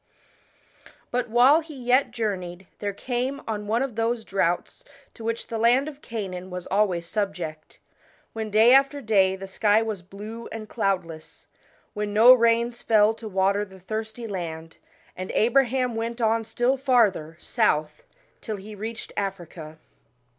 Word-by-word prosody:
But 245 -1 -1
while 250 +7 +6
he 310 -2 -11
yet 255 +1 +2
journeyed, 185 -5 -4
there 205 -1 -2
came 250 +6 -3
on 210 -2 -4
one 230 +4 +1
of 265 -5 -5
those 230 0 -1
droughts 175 -3 -1 0.3
to 230 - -11
which 230 +1 -2
the 225 - -4
land 245 +5 +3
of 295 -1 -9
Canaan 190 -5 -6
was 180 -1 -6
always 190 -4 +1
subject, 175 -6 -4 0.6
when 220 -1 -4
day 220 +4 +6
after 275 +1 +4
day 195 -6 +2
the 195 0 -8
sky 210 +3 +2
was 215 -4 -4
blue 210 +5 -9
and 220 -1 -7
cloudless, 185 -8 -3 0.5
when 210 -1 -3
no 235 +4 +9
rains 235 0 +2
fell 215 -1 +4
to 225 0 -9
water 195 +1 +1
the 190 -2 -12
thirsty 220 +4 -5
land, 165 -5 -6 0.4
and 185 +1 -6
Abraham 250 +1 +2
went 230 +1 -3
on 225 0 +1
still 245 +4 0
farther 220 - +2
south 155 -11 0 0.4
till 215 - -4
he 205 +2 -10
reached 220 +2 -7
Africa. 175 -5 -5
215 Hz, 150 wpm, -25 LUFS, 190-235 Hz, 0.6 s, no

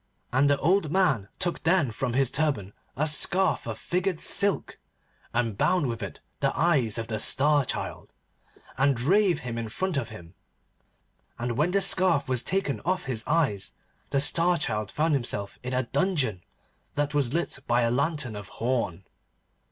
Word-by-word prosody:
And 135 +3 +4
the 145 - +3
old 165 +1 +1
man 150 - +2
took 180 -2 -1
then 160 -6 +2
from 115 +2 -3
his 130 0 +2
turban 135 -11 -1 0.2
a 150 - +1
scarf 175 +2 +2
of 110 -2 -4
figured 180 - -2
silk, 200 -1 +2 0.5
and 115 -3 -1
bound 180 - +2
with 115 -3 -3
it 100 - -7 0.2
the - - +1
eyes 145 -10 +2
of 115 - -2
the 110 -1 -3
Star 145 +5 +3
Child, 120 - -4 0.7
and 135 0 +3
drave 180 - +2
him 115 -2 -4
in 115 -1 -4
front 185 - -1
of 120 -5 -2
him. 85 -6 -12 1.0
And 120 +1 -2
when 150 +7 +2
the 200 +2 +1
scarf 185 -6 +3
was 130 -2 0
taken 190 -7 -1
off 185 +1 -1
his 120 -4 -2
eyes, 145 -12 0 0.4
the 140 - +1
Star 170 +5 +3
Child 105 -8 -2
found 155 +5 0
himself 105 -7 -2
in 125 - -5
a 130 - +1
dungeon, 135 - 0 0.5
that 145 0 -1
was 140 -5 +1
lit 170 -4 -2
by 120 +1 +3
a 115 - +1
lantern 140 -3 -1
of 105 -2 -8
horn. 115 -7 -1
140 Hz, 170 wpm, -26 LUFS, 115-170 Hz, 1.0 s, And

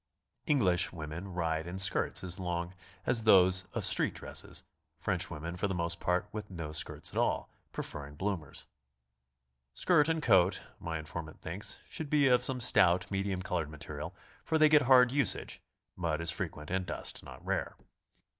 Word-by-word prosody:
(Eng 145 -2 +3
lish 90 -2 +2
women 80 +2 -6
ride 80 -2 -2
in 90 +2 -5
skirts 95 -1 +3
as 90 0 -3
long 85 -1 -3 0.3
as 115 -2 +2
those 95 -3 +5
of - - 0
street - - +4
dresses; - - -4 0.4
French - - -1
women 85 +3 -6
for 95 +3 -1
the 95 - -3
most 85 0 -1
part 90 0 0
with 105 -1 -6
no 85 -5 -6
skirts 75 - -2
at - - -2
all, - - 0 0.2
pre - - -4
ferring 75 0 -7
bloomers.) 95 -7 -4 1.1
Skirt 165 -4 +3
and 160 -1 0
coat, 95 -4 +4 0.2
my 80 -1 -4
informant 80 0 -7
thinks, 90 +6 -4
should 160 -4 -5
be 145 -2 +4
of 125 -1 +4
some 125 0 0
stout, 90 -7 +4
mediuim 95 -1 -2
colored 85 -5 -2
material, 75 -1 -7 0.3
for 160 - +1
they 155 -1 +6
get 150 -1 +6
hard 125 -2 +6
usage, 140 -5 0 0.3
mud 85 -3 -1
is 85 0 +3
frequent, 75 -1 -5
and 95 -1 -1
dust - - -3
not - - -12
rare. - - -2
90 Hz, 175 wpm, -31 LUFS, 85-110 Hz, 1.1 s, they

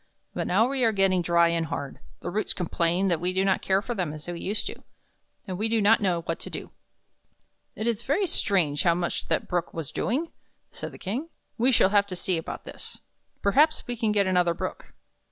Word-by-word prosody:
But - - -2
now 215 +6 +3
we 265 -1 -1
are 225 - +4
getting 195 -3 +3
dry 170 0 +4
and 165 -1 0
hard, 140 -2 -5 0.2
the 175 - -4
roots 215 +4 -1
complain 175 +1 0
that 170 -3 +1
we 180 +1 0
do 190 +1 +1
not 195 - +2
care 195 +1 +1
for 240 - -3
them 180 -8 -2
as 155 0 -9
we 175 -1 -4
used 205 +5 -1
to; - - -6 0.6
and 185 -2 -5
we 220 +1 0
do 225 0 +2
not 215 +2 +5
know 180 -4 +1
what 165 0 -3
to - - -5
do." - - -5 1.0
"It 215 - -4
is 235 -2 0
very 290 +11 +1
strange 175 - +2
how 170 -2 +3
much 175 0 -2
that - - 0
Brook 175 -1 -2
was 165 -4 -5
doing," 300 +8 -1 0.4
said - - -7
the - - -11
King. 250 - -4 0.3
"We 250 +3 +3
shall 210 -6 +5
have 200 0 +3
to 185 - -5
see 175 -1 0
about 160 - -7
this. - - -10 0.5
Perhaps 295 +10 +3
we 245 - -3
can 225 -2 0
get 205 -1 +3
another 180 -2 +2
Brook. - - -6
190 Hz, 220 wpm, -26 LUFS, 170-225 Hz, 1.0 s, not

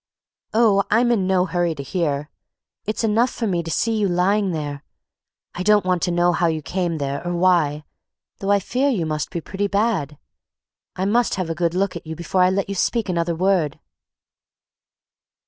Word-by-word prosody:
"Oh, 215 -3 +4
I'm 240 +3 +3
in 195 -6 +1
no 185 -1 +2
hurry 175 -2 -1
to 140 - -6
hear. 145 -2 -2 0.5
It's 215 +2 -2
enough 225 +3 +3
for 235 - -4
me 180 -5 0
to 165 - -7
see 225 +8 0
you 205 - +2
lying 190 +3 +1
there. 145 -4 -4 0.7
I 180 - -5
don't 210 +1 +3
want 180 -2 +1
to 185 - 0
know 175 0 +3
how 170 - +1
you 160 -2 -2
came 175 0 -2
there, 140 0 -3
or 175 0 -2
why, 170 -5 +2 0.6
though 195 - -3
I 200 0 +4
fear 260 +8 0
you 200 -11 0
must 155 -1 -2
be 170 - -4
pretty 200 +4 -2
bad. 200 - 0 0.8
I 185 - -1
must 235 +3 +2
have 185 -3 -2
a - - 0
good 170 +1 -1
look 195 0 0
at 170 - -8
you 160 - -5
before 170 +3 -1
I 180 - +5
let 195 +1 0
you 200 - -3
speak 220 +2 0
another 170 -1 0
word!" 180 -4 +1
180 Hz, 195 wpm, -22 LUFS, 165-200 Hz, 0.8 s, I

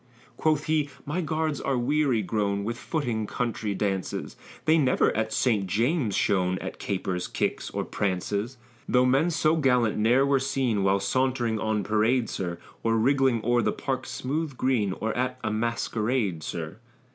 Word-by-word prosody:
Quoth 155 -2 +1
he, 155 -2 +1 0.2
my 150 +6 -1
guards 155 -2 -1
are 135 -2 0
weary 130 -2 +1
grown 100 0 -1
With 115 +3 -2
footing 120 -6 -2
country 110 -4 -2
dances, 95 -1 -2 0.3
They 160 +1 +5
never 130 -4 +2
at 110 0 -1
St. 105 -6 +1
James's 115 - +1
shone, 95 -2 +1
At - - -6
capers, 95 -2 -2
kicks, - - -2
or - - -3
prances. 100 +5 -2 0.3
Though 125 0 +4
men 135 +7 +3
so 160 -1 +2
gallant 125 -7 +2
ne'er 120 +5 +4
were 140 -1 +3
seen, 130 -5 0
While 95 0 +2
sauntering 120 0 0
on 110 -1 0
parade, 110 +3 +1
sir, 85 -2 -3 0.2
Or 115 0 +1
wriggling 130 -1 +2
o'er 120 0 +3
the - - +1
park's 130 -2 -3
smooth 145 +1 -3
green, 115 -7 +1
Or 110 +3 -3
at 125 +1 -1
a 110 - -1
masquerade, 110 -3 -1
sir. 80 +3 -5
120 Hz, 160 wpm, -26 LUFS, 105-135 Hz, 0.3 s, They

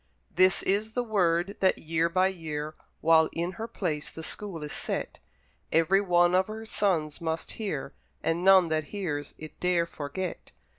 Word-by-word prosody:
This 185 0 +4
is 210 +3 0
the 245 - 0
word 185 -4 +1
that 190 - +3
year 165 +1 0
by 185 +2 +3
year, 155 -4 -5 0.3
While 160 0 +5
in 170 +2 -2
her 225 +4 -6
place 170 -10 -3
the 160 - -8
school 180 -2 -5
is 150 - -5
set, - - -3 0.5
Every 165 +5 +4
one 175 -2 +3
of 185 +1 +3
her 220 +1 -7
sons 175 -8 0
must 160 0 -3
hear, 150 -11 -4 0.3
And 165 +2 0
none 190 -3 +6
that 155 -1 0
hears 150 -7 -4
it 155 0 -10
dare 180 -2 +2
forget. 170 +3 -6
175 Hz, 165 wpm, -28 LUFS, 160-195 Hz, 0.5 s, none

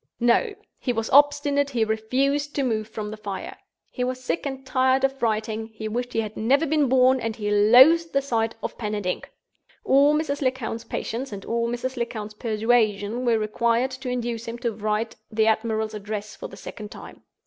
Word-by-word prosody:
No! 245 - +2 0.2
He 250 - -1
was 225 -1 -3
obstinate; 285 0 +4
he 235 -5 +1
refused 270 +7 0
to 280 - +1
move 220 -4 -1
from 215 -1 -6
the 215 - -7
fire; 200 -3 -6 0.4
he 250 - -3
was 255 0 -2
sick 270 +4 -2
and 270 -1 -6
tired 260 0 +2
of 270 0 0
writing: 220 -1 -1
he 220 0 -5
wished 245 +3 -3
he 225 - +1
had 215 -1 -6
never 270 +8 +2
been 295 -3 +2
born, 260 0 +4
and 225 -2 -3
he 210 -1 -3
loathed 260 +11 +6
the 275 - +2
sight 230 -5 -1
of - - -5
pen 210 -2 -2
and 205 -2 -4
ink. 180 - -3 0.6
All 285 +2 +5
Mrs. 300 -2 -1
Lecount's 255 -4 -2
patience 245 +3 -4
and 200 -1 -7
all 235 0 -1
Mrs. 250 +2 -3
Lecount's 220 -3 -4
persuasion 220 0 0
were 235 -2 +3
required 230 +4 +1
to 260 0 -6
induce 240 -2 -3
him 230 +1 -5
to 240 -1 -2
write 215 +1 -2
the 220 0 +2
admiral's 220 0 0
address 210 0 -5
for - - -7
the 195 - -12
second 210 +1 -8
time. - - -11
235 Hz, 195 wpm, -24 LUFS, 215-265 Hz, 0.6 s, loathed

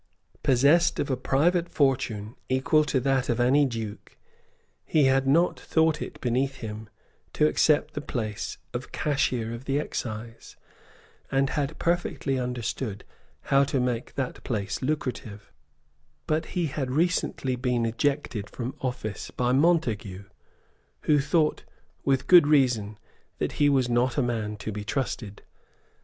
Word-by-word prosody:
Possessed 140 +7 +4
of 140 - -1
a - - +2
private 170 +7 +1
fortune 125 -6 0
equal 130 +4 +3
to 140 - +1
that 135 0 +1
of 120 - +1
any 135 +4 +4
duke, 115 -4 -7 0.7
he 155 - +2
had 135 0 +3
not 165 +6 +3
thought 160 -1 +1
it - - -6
beneath 130 +2 0
him 110 -3 -7 0.4
to 150 - +3
accept 155 0 +3
the 145 - -4
place 110 -6 -4 0.2
of 120 +1 -5
Cashier 125 -6 0
of 115 +3 -8
the 140 +1 +1
Excise, 115 -5 -6 0.8
and 135 0 +2
had 145 +1 -2
perfectly 170 -6 -1
understood 125 -3 -3 0.5
how 135 0 +6
to 135 -1 -1
make 125 -2 -2
that 135 -2 -4
place 100 -4 -3
lucrative; 130 -7 -4 0.7
but 155 +1 0
he 175 - +2
had 135 -3 -3
recently 150 -3 0
been 125 -2 0
ejected 115 -2 -1
from 125 +1 -5
office 125 -5 -4
by 125 0 0
Montague, 125 - +1 0.8
who 150 -1 +3
thought, 150 +2 +1 0.4
with 135 -1 +1
good 175 -5 +7
reason, 125 -8 +2 0.4
that - - -1
he 145 - +6
was 135 -3 +2
not 120 +2 +1
a 140 - +3
man 110 -3 -2
to 110 - -5
be 105 0 -5
trusted. 110 -3 -4
130 Hz, 140 wpm, -26 LUFS, 115-145 Hz, 0.8 s, good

